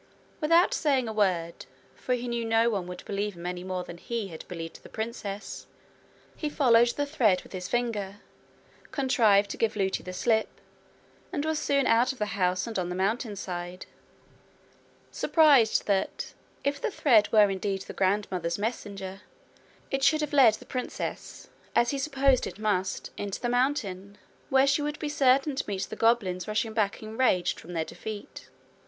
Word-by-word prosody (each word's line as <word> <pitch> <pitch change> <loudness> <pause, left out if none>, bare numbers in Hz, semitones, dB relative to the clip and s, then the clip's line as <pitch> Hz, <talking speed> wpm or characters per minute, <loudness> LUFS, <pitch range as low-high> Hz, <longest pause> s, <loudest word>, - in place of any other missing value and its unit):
Without 335 +4 +4
saying 270 -6 +1
a 220 - -4
word, 180 -5 0 0.3
for 250 - -1
he 245 0 -5
knew 235 -1 -2
no 225 +1 +3
one 195 -4 -2
would 180 0 -8
believe 205 0 -2
him 170 0 -9
any 180 0 -4
more 185 -1 -3
than 170 -1 -10
he 230 -2 -4
had 160 -2 -10
believed 165 -3 -7
the - - -13
princess, 215 -2 -5 0.7
he 305 - -3
followed 240 -5 +5
the 285 +4 -1
thread 225 -11 +2
with - - -17
his 180 -1 -4
finger, 210 -4 -2 0.7
contrived 225 -7 +3
to - - -5
give 225 -1 0
Lootie 190 -2 0
the 185 - -6
slip, 220 +4 +1 0.8
and 305 -4 -2
was 315 -1 0
soon 280 -3 +1
out 235 +3 +4
of 265 - -10
the 210 -1 -2
house 180 0 +2
and 225 -4 -3
on 175 -1 -2
the 180 - -3
mountainside 190 -4 -3 1.3
surprised 285 -9 +4
that, 195 -2 -1 0.3
if 280 0 -1
the - - 0
thread 230 - +3
were 210 -3 +6
indeed 195 0 -2
the - - -9
grandmother's 185 -3 0
messenger, 200 -3 -4 0.7
it 270 - 0
should 310 +3 +4
have 300 -1 -3
led 250 -7 +6
the - - -14
princess, 255 -2 -5 0.3
as 240 0 +3
he 280 - -2
supposed 275 -2 +2
it - - -8
must, 195 -4 -1
into 200 -1 -4
the 240 - -2
mountain, 205 -7 -1 0.3
where 265 0 +5
she 280 +2 +2
would 295 0 -2
be 300 - -3
certain 275 -1 +3
to 275 - -2
meet 195 -2 -2
the 220 - -6
goblins 215 -6 +1
rushing 215 +1 -1
back 215 -1 0
enraged 220 -4 +1
from 175 - -10
their 165 -1 -1
defeat. 215 +3 -8
220 Hz, 170 wpm, -28 LUFS, 190-260 Hz, 1.3 s, were